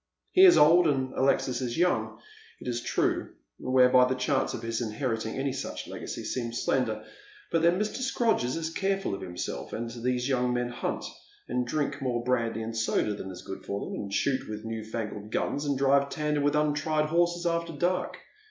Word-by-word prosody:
He 380 +1 +8
is 360 - +8
old, 165 +3 +7
and 130 -3 0
Alexis 130 -1 +1
is 120 +1 -3
young, 180 +1 +1 0.4
it - - -9
is 120 -1 -1
true, - - -1 0.2
whereby 125 0 +5
the 130 - 0
chances 130 +2 0
of 115 - -10
his 115 +1 -2
inheriting 115 0 -2
any 135 0 -1
such 135 - -5
legacy - - -6
seem 120 -2 -3
slender. 115 -3 0 0.5
But 165 - +2
then 170 +2 +4
Mr. 210 +2 -1
Scrodgers 235 - +1
is 165 0 -3
careful 195 - 0
of 100 - -4
himself, 90 -8 -5
and 115 0 -4
these 125 +1 -1
young 125 -2 +1
men 120 0 -1
hunt, 120 - -3 0.4
and 125 -1 -1
drink 145 +2 -1
more 120 -3 -1
brandy 115 -3 0
and 115 +1 -5
soda 110 -1 +1
than 95 -2 -6
is 90 - -9
good 95 - -7
for 100 - -3
them, - - -6
and 100 - -5
shoot 130 +5 0
with 105 +1 -6
new 110 -1 -4
fangled 105 -1 -5
guns, 145 +6 -1
and 140 -2 0
drive 140 +1 +3
tandem 150 0 -1
with 145 +1 +2
untried 150 +1 +1
horses 175 +1 +1
after 170 0 0
dark. 175 +4 -1
130 Hz, 190 wpm, -28 LUFS, 115-150 Hz, 0.5 s, He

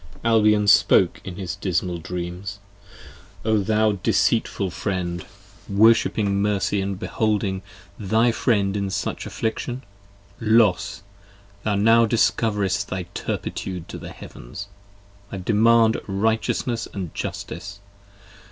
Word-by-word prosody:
Albion 105 -2 +4
spoke 100 - +4
in 95 - -7
his 90 -1 -4
dismal 90 -3 -1
dreams: 90 +4 -5 0.9
O 110 -1 +3
thou 110 +2 +2
deceitful 100 0 +1
friend, 85 -1 -3
46 100 +1 -20
io - - -3
Worshipping 105 -2 +4
mercy 100 -1 0
& - - -2
beholding 100 -1 -1 0.4
thy 110 +4 +2
friend 100 -5 +1
in 100 -1 -1
such 100 +1 -3
affliction: 120 +3 -3 0.6
Los! 110 -5 +2 0.6
thou 105 -1 0
now 115 +3 +5
discoverest 105 -3 +1
thy 95 -1 -3
turpitude 90 -3 -4
to - - -7
the - - -8
heavens. - - -10 0.6
I - - -4
demand 110 +3 +3
righteousness 110 +3 0 0.2
& 85 - -8
justice. 100 0 -6
100 Hz, 115 wpm, -23 LUFS, 95-110 Hz, 0.9 s, now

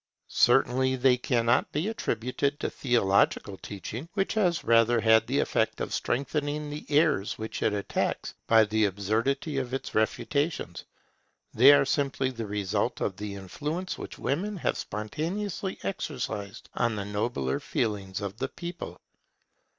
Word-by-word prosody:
Certainly 130 +2 +4
they 130 0 +4
cannot 120 -1 +1
be 155 +7 -1
attributed 140 - -1
to - - -2
theological 100 -5 +2
teaching, 105 - -7
which 195 -1 0
has 185 -6 +1
rather 115 0 +4
had 110 0 +4
the - - 0
effect - - +1
of - - -3
strengthening 145 +3 -1
the 150 - -7
errors 145 -9 +2
which 110 0 -5
it - - +2
attacks 100 -1 -2
by 115 -1 +7
the 110 0 +2
absurdity 115 - 0
of 130 -1 -3
its 135 - -5
refutations. 145 +8 -1 0.7
They 130 +5 +8
are 145 -1 +5
simply 135 -2 0
the 115 -3 -5
result 100 -2 -1
of 95 - -1
the 105 -1 -5
influence 150 - -4
which - - -7
women 195 +9 -2
have - - 0
spontaneously 170 - -3
exercised 125 - -4
on 120 -2 0
the 100 -1 -3
nobler 105 - -1
feelings 100 -4 -2
of 100 +1 -5
the 135 +2 -2
people. 175 +1 -7
125 Hz, 145 wpm, -28 LUFS, 105-145 Hz, 0.7 s, They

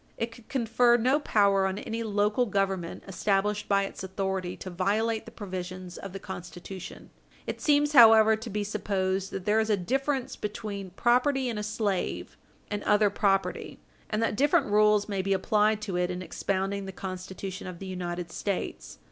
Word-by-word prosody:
It 230 0 -2
could 235 -2 -17
confer 240 -1 +3
no 255 +5 +2
power 200 -7 +3
on 190 +1 -3
any 225 +2 -4
local 210 +2 +1
Government 195 -4 -1
established 200 +2 0
by 200 -1 +3
its 195 - -8
authority 190 -1 -3
to 185 - -7
violate 215 +5 0
the - - -10
provisions 185 -3 -6
of 195 - -7
the 195 - -6
Constitution. 185 0 -9 0.3
It - - -5
seems, 295 -1 +3
however, 220 -3 +8
to 225 +2 -7
be 210 0 -2
supposed 195 -2 -1
that 190 -2 -6
there 210 +1 +3
is 220 0 0
a 210 - +3
difference 270 +7 -1
between 205 -2 -5
property 255 +3 +2
in 225 -3 -3
a - - -3
slave 210 -3 -2 0.4
and 205 0 -2
other 210 -1 +3
property 195 -2 0 0.3
and 215 +1 0
that 225 - 0
different 280 -3 +2
rules 210 0 +4
may 200 -2 -1
be 195 +1 +1
applied 210 +2 +2
to 195 -4 -2
it 180 0 +1
in 180 0 -4
expounding 195 +1 -2
the - - -5
Constitution 185 0 -6
of 180 -1 -7
the 195 - -8
United 175 -2 -4
States. 200 +1 -4
200 Hz, 175 wpm, -28 LUFS, 190-220 Hz, 0.4 s, however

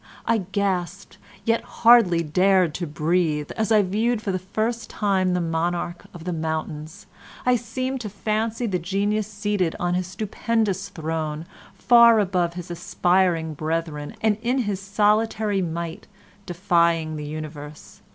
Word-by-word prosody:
I 230 -1 +2
gasped, 195 -2 -3 0.3
yet 230 -1 +2
hardly 230 -8 +4
dared 180 +1 +3
to 175 +1 -4
breathe, 155 -1 0
as 220 0 -1
I 215 -2 +5
viewed 220 +5 0
for 205 -2 -3
the 185 - -1
first 220 +4 -3
time 190 -3 +1
the - - +1
monarch 170 +1 -2
of 170 - -11
the 180 0 -3
mountains. 155 -1 -4 0.4
I 250 0 +4
seemed 255 +3 -3
to 215 - -5
fancy 220 +3 -2
the 190 -5 -1
genius 200 +4 -1
seated 205 -5 -1
on 175 0 0
his 180 0 -1
stupendous 200 0 -1
throne 160 -3 -4 0.3
far 235 -2 +6
above 180 -4 0
his 180 -1 -7
aspiring 175 -1 +1
brethren 155 +2 -3
and 215 -1 +2
in 245 +3 0
his 200 -3 -3
solitary 210 0 +1
might 170 -1 -4 0.4
defying 170 -3 +1
the 150 -1 -5
universe. 150 -1 -8
185 Hz, 140 wpm, -23 LUFS, 165-215 Hz, 0.4 s, far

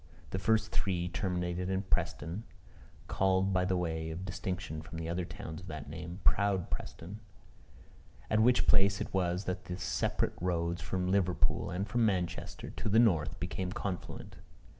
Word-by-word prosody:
The 95 - -1
first 110 +3 +2
three 90 -3 0
terminated 90 -1 -1
in 95 +1 0
Preston, 90 0 -1 0.6
(called, 95 0 +2
by 90 0 +3
way 85 -3 0
of 85 +4 -5
distinction 90 -4 -3
from 80 0 -6
other 85 +1 -1
towns 85 -2 -7
of 90 - -11
that 75 -2 -6
name, 85 +4 -6
proud 100 -3 +3
Preston,) 95 +6 -5 1.1
at 105 - +3
which 120 +3 +5
place 100 -1 +5
it - - -4
was 90 0 +1
that 90 0 -3
the 90 - -4
separate 90 - 0
roads 85 -1 0
from 90 +1 -1
Liverpool 95 -2 +2
and 95 +4 -2
from 120 +3 +2
Manchester 95 -5 -1
to - - -3
the 105 - +4
north 85 -10 +4
became 90 +1 -2
confluent. 95 -3 -4
90 Hz, 155 wpm, -32 LUFS, 85-95 Hz, 1.1 s, which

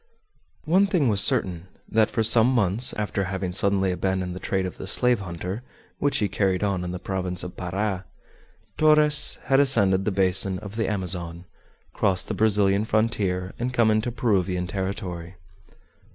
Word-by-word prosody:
One 185 +6 +3
thing 170 - +1
was 100 -2 +3
certain, 90 -3 +1 0.2
that 110 0 +1
for 115 - -1
some 115 +1 +4
months, 115 0 +4
after 100 -2 -3
having 95 -1 -4
suddenly 95 0 +1
abandoned 90 -1 -3
the - - -7
trade 95 0 -2
of 90 - -7
the - - -8
slave 125 +3 +3
hunter, 90 +3 -6 0.4
which 145 -1 0
he 105 - 0
carried 95 -1 -1
on 100 -3 -1
in 90 - -5
the 90 - -5
province 90 -1 -3
of 90 0 -8
Para, 95 +1 -4 0.7
Torres 150 -1 +4
had 135 +2 +2
ascended 100 -9 +3
the 105 - 0
basin 95 0 +3
of 100 +1 -10
the 110 -3 -2
Amazon, 90 -3 -1 0.5
crossed 95 -3 -1
the - - -2
Brazilian 105 -2 +1
frontier, 100 -4 -1
and 125 +1 -3
come 115 -2 +3
into 110 +3 -1
Peruvian 95 -6 -1
territory. 95 -2 -6
100 Hz, 165 wpm, -23 LUFS, 90-110 Hz, 0.7 s, some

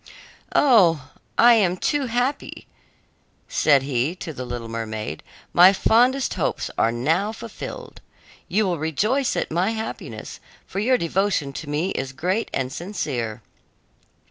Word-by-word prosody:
"Oh, 175 - +4 0.3
I 240 0 +7
am 185 -5 +2
too 285 +6 0
happy!" 245 +4 -2 0.8
said 140 -3 +3
he 135 +4 -1
to 170 -3 -7
the 130 - -6
little 120 -1 -5
mermaid; 110 -6 -5 0.3
"my 180 +3 +8
fondest 250 +7 +3
hopes - - -2
are 115 - +2
now 160 - 0
fulfilled. 225 0 -9 0.5
You 215 +3 +1
will 175 -4 -1
rejoice 210 - 0
at - - -2
my 175 +5 +1
happiness, 220 0 -6 0.3
for 195 - -5
your 250 +5 +3
devotion 170 - 0
to 145 - -7
me 155 +6 -1
is 135 0 -4
great 185 +10 -1
and 130 0 -2
sincere." 130 - -4
175 Hz, 135 wpm, -23 LUFS, 135-220 Hz, 0.8 s, my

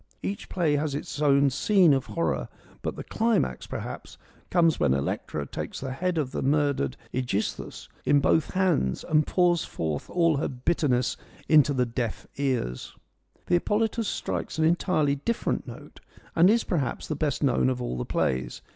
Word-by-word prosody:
Each 200 +2 -4
play 160 -5 +1
has 145 -1 -1
its 145 0 -5
own 140 -1 +4
scene 180 +2 +4
of 135 -1 0
horror, 170 - -1 0.3
but - - -3
the - - -6
climax, 220 - 0
perhaps, - - -7 0.3
comes 165 -3 +3
when 65 - +3
no - - +2
FEMINISM - - -1
IN 70 - -2
GREEK - - -2
LITERATURE - - -8
Electra - - -3
takes - - -8
the 135 -1 -4
head 175 +6 -1
of 140 -5 -1
the - - -3
murdered 140 - +1 0.2
^Egisthus 120 -5 -3 0.2
in 145 - +4
both 145 +2 +2
hands 180 - +1
and 155 -1 +2
pours 175 -3 +3
forth 80 -3 -4
all 165 -4 +2
her 140 - 0
bitterness 130 -2 0 0.3
into 150 -2 +5
the 125 -1 +2
deaf 115 -1 -3
ears. 130 - -2 0.5
The - - -2
Hippolytus 215 +5 +1
strikes - - -3
an 160 - +3
entirely 160 -4 +2
different 230 +12 -2
note, - - -11 0.4
and 170 +3 +6
is, 230 +2 +3
perhaps, 145 -9 -2
the 155 - -2
best 150 0 -1
known 130 -1 +3
of 125 -1 -2
all 120 - -3
the - - -1
plays. 65 -1 -1
145 Hz, 180 wpm, -26 LUFS, 125-170 Hz, 0.5 s, and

